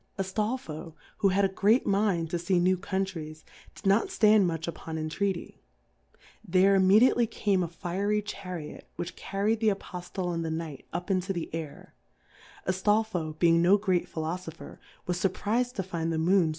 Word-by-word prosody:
Aftolfo, 195 Hz, -5 st, -3 dB, 0.2 s
who 200 Hz, -, +3 dB
had 195 Hz, +1 st, +3 dB
a -, -, +4 dB
great 205 Hz, +5 st, +2 dB
Mind 195 Hz, -5 st, +1 dB
to 175 Hz, -, -1 dB
fee 175 Hz, +2 st, +1 dB
New 180 Hz, +2 st, +3 dB
Countries^ 180 Hz, -5 st, -4 dB, 0.3 s
did -, -, -14 dB
not 200 Hz, +3 st, +4 dB
ft -, -, -9 dB
and 210 Hz, -3 st, +6 dB
much 165 Hz, -1 st, -3 dB
upon 165 Hz, -1 st, -5 dB
intreaty, 170 Hz, +4 st, -3 dB, 0.8 s
there 190 Hz, 0 st, +4 dB
im* 190 Hz, -1 st, +4 dB
mediately 230 Hz, +4 st, +5 dB
came 205 Hz, -4 st, 0 dB
a 175 Hz, -, 0 dB
fiery 195 Hz, +5 st, -1 dB
Chariot 180 Hz, -6 st, -7 dB
which 175 Hz, -, -5 dB
carrfd 205 Hz, +3 st, -1 dB
the 220 Hz, -1 st, +3 dB
Apoftleand 180 Hz, -3 st, -4 dB
the 165 Hz, -, -2 dB
Kjtight 160 Hz, -4 st, -5 dB
up 175 Hz, +3 st, -3 dB
into 190 Hz, +1 st, 0 dB
the 170 Hz, -3 st, -5 dB
Air, 160 Hz, -3 st, -7 dB, 0.7 s
Aftolfo 185 Hz, -4 st, 0 dB
being 170 Hz, 0 st, +4 dB
no 185 Hz, +4 st, +6 dB
great 190 Hz, -4 st, 0 dB
Philofopher^ 160 Hz, +1 st, -5 dB, 0.3 s
was 180 Hz, 0 st, -1 dB
furpriz^d 220 Hz, +6 st, 0 dB
to 195 Hz, -, -2 dB
find 170 Hz, -3 st, -3 dB
the 160 Hz, -, -1 dB
Moony2? 170 Hz, +1 st, +3 dB
185 Hz, 165 wpm, -28 LUFS, 170-200 Hz, 0.8 s, and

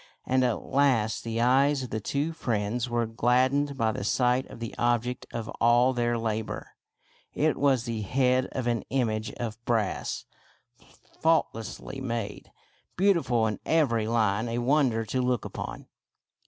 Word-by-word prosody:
And 130 Hz, 0 st, +2 dB
at 120 Hz, -3 st, 0 dB
last 125 Hz, -6 st, +1 dB
the 115 Hz, 0 st, -3 dB
eyes 135 Hz, +3 st, +3 dB
of 125 Hz, -, -7 dB
the 110 Hz, -, -1 dB
two 145 Hz, +9 st, -2 dB
friends 115 Hz, -2 st, -2 dB
were 120 Hz, 0 st, +1 dB
gladdened 130 Hz, +5 st, +1 dB
by 115 Hz, -2 st, +2 dB
the 105 Hz, -, -4 dB
sight 125 Hz, +4 st, +1 dB
of -, -, -11 dB
the 115 Hz, -1 st, -5 dB
object 120 Hz, +1 st, 0 dB
of 115 Hz, -2 st, -4 dB
all 120 Hz, +2 st, +5 dB
their 120 Hz, -1 st, 0 dB
labor. 110 Hz, -1 st, -3 dB, 0.6 s
It 155 Hz, 0 st, +2 dB
was 135 Hz, -4 st, +2 dB
the 115 Hz, -3 st, -3 dB
head 130 Hz, +4 st, +2 dB
of 130 Hz, -, -2 dB
an 120 Hz, -2 st, 0 dB
image 110 Hz, -4 st, -1 dB
of 115 Hz, -1 st, -6 dB
brass 115 Hz, -5 st, -1 dB, 0.5 s
— -, -, -26 dB
faultlessly 135 Hz, -5 st, 0 dB
made, 115 Hz, -5 st, -4 dB, 0.5 s
beautiful 170 Hz, -, +3 dB
in 105 Hz, -2 st, -2 dB
every 120 Hz, -9 st, +2 dB
line, 110 Hz, -1 st, +1 dB
a 115 Hz, -, -2 dB
wonder 120 Hz, -3 st, +2 dB
to 130 Hz, +4 st, -1 dB
look 125 Hz, -2 st, 0 dB
upon. -, -, -6 dB
120 Hz, 155 wpm, -27 LUFS, 115-130 Hz, 0.6 s, all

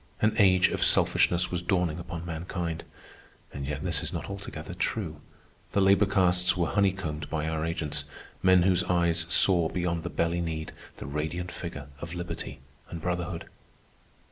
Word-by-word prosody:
An 110 Hz, 0 st, +3 dB
age 95 Hz, -3 st, +6 dB
of -, -, 0 dB
selfishness 90 Hz, +1 st, +3 dB
was 90 Hz, -1 st, -1 dB
dawning 85 Hz, -3 st, 0 dB
upon 85 Hz, 0 st, -6 dB
mankind. 85 Hz, 0 st, -4 dB, 0.7 s
And 70 Hz, -1 st, -5 dB
yet 75 Hz, -, -3 dB
this -, -, +1 dB
is -, -, -4 dB
not -, -, -5 dB
altogether 90 Hz, -5 st, -7 dB
true. 90 Hz, -4 st, -2 dB, 0.5 s
The -, -, +3 dB
labor 100 Hz, +1 st, +5 dB
castes 90 Hz, -2 st, +3 dB
were 85 Hz, -, +2 dB
honeycombed 95 Hz, -7 st, 0 dB
by 80 Hz, -1 st, -1 dB
our 80 Hz, -1 st, -1 dB
agents—men 80 Hz, +3 st, 0 dB
whose 95 Hz, 0 st, +3 dB
eyes 85 Hz, -1 st, +2 dB
saw, 85 Hz, -1 st, +5 dB
beyond 85 Hz, -2 st, -1 dB
the -, -, -4 dB
belly 85 Hz, +1 st, 0 dB
need, 80 Hz, -2 st, -3 dB, 0.3 s
the -, -, -7 dB
radiant 75 Hz, +5 st, -3 dB
figure 70 Hz, -5 st, -7 dB
of 85 Hz, +2 st, -6 dB
liberty 85 Hz, -6 st, -6 dB, 0.3 s
and 85 Hz, -, -6 dB
brotherhood. 85 Hz, 0 st, -3 dB
85 Hz, 155 wpm, -28 LUFS, 80-90 Hz, 0.7 s, age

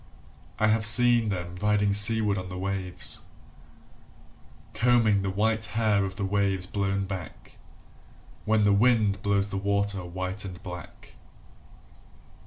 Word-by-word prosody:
I 110 Hz, -, +2 dB
have 110 Hz, 0 st, +1 dB
seen 115 Hz, +1 st, +5 dB
them 90 Hz, -2 st, -5 dB
riding 105 Hz, -1 st, +1 dB
seaward 105 Hz, 0 st, +4 dB
on 90 Hz, 0 st, -8 dB
the 90 Hz, -, -7 dB
waves 95 Hz, -1 st, -3 dB, 1.5 s
Combing 115 Hz, -4 st, +2 dB
the 95 Hz, -, -3 dB
white 110 Hz, +3 st, -1 dB
hair 105 Hz, -3 st, +2 dB
of 95 Hz, 0 st, -6 dB
the 100 Hz, -, -3 dB
waves 95 Hz, -1 st, 0 dB
blown 100 Hz, 0 st, -2 dB
back 95 Hz, -4 st, -9 dB, 0.8 s
When 110 Hz, 0 st, +1 dB
the 105 Hz, 0 st, +3 dB
wind 105 Hz, -2 st, +2 dB
blows 100 Hz, 0 st, 0 dB
the 100 Hz, -, -4 dB
water 100 Hz, -1 st, -1 dB
white 95 Hz, +3 st, -5 dB
and 95 Hz, -3 st, -8 dB
black. 90 Hz, -3 st, -10 dB
100 Hz, 130 wpm, -26 LUFS, 95-110 Hz, 1.5 s, seen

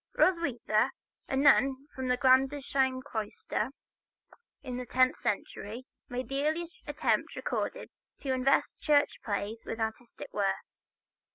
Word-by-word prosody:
Roswitha, 270 Hz, -, +3 dB, 0.4 s
a -, -, -1 dB
nun 275 Hz, -1 st, +5 dB, 0.2 s
of 260 Hz, -1 st, -3 dB
the 250 Hz, 0 st, +2 dB
Gandersheim 265 Hz, 0 st, +3 dB
cloister, 220 Hz, -1 st, -3 dB, 0.9 s
in 250 Hz, -1 st, -4 dB
the 250 Hz, -, -4 dB
tenth 255 Hz, 0 st, +3 dB
century, 210 Hz, +3 st, -3 dB, 0.2 s
made 250 Hz, +1 st, -3 dB
the 275 Hz, +1 st, -1 dB
earliest 325 Hz, +3 st, 0 dB
attempt -, -, 0 dB
recorded -, -, -2 dB, 0.3 s
to 270 Hz, -2 st, 0 dB
invest 260 Hz, +1 st, +2 dB
church 290 Hz, -1 st, +2 dB
plays 210 Hz, +1 st, -2 dB
with 225 Hz, -, -5 dB
artistic 230 Hz, -, -5 dB
worth. -, -, +2 dB
260 Hz, 120 wpm, -30 LUFS, 245-280 Hz, 0.9 s, nun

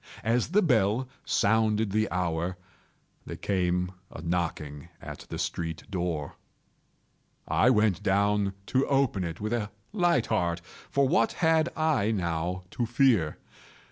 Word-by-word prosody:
As 115 Hz, +2 st, +1 dB
the 205 Hz, +5 st, +3 dB
bell 120 Hz, -, +2 dB, 0.2 s
sounded 110 Hz, 0 st, +2 dB
the 110 Hz, +2 st, +1 dB
hour, 85 Hz, 0 st, -1 dB, 0.7 s
there -, -, -5 dB
came 90 Hz, -2 st, 0 dB, 0.2 s
a -, -, -9 dB
knocking 80 Hz, -3 st, -3 dB
at -, -, -9 dB
the -, -, -4 dB
street 80 Hz, -2 st, -3 dB
door. 85 Hz, -6 st, -3 dB, 1.1 s
I -, -, +4 dB
went 105 Hz, -7 st, +3 dB
down 100 Hz, 0 st, +2 dB
to 130 Hz, +4 st, +1 dB
open 135 Hz, -9 st, +2 dB
it 85 Hz, -1 st, -5 dB
with 110 Hz, +2 st, -2 dB
a 110 Hz, -4 st, -1 dB, 0.2 s
light 175 Hz, -, +2 dB
heart,—for 90 Hz, +7 st, -1 dB
what 175 Hz, +8 st, +2 dB
had 160 Hz, -1 st, +2 dB
I 155 Hz, -10 st, +2 dB
now 90 Hz, -2 st, -1 dB
to 120 Hz, -, -2 dB
fear? 120 Hz, -, +3 dB
100 Hz, 130 wpm, -28 LUFS, 90-125 Hz, 1.1 s, I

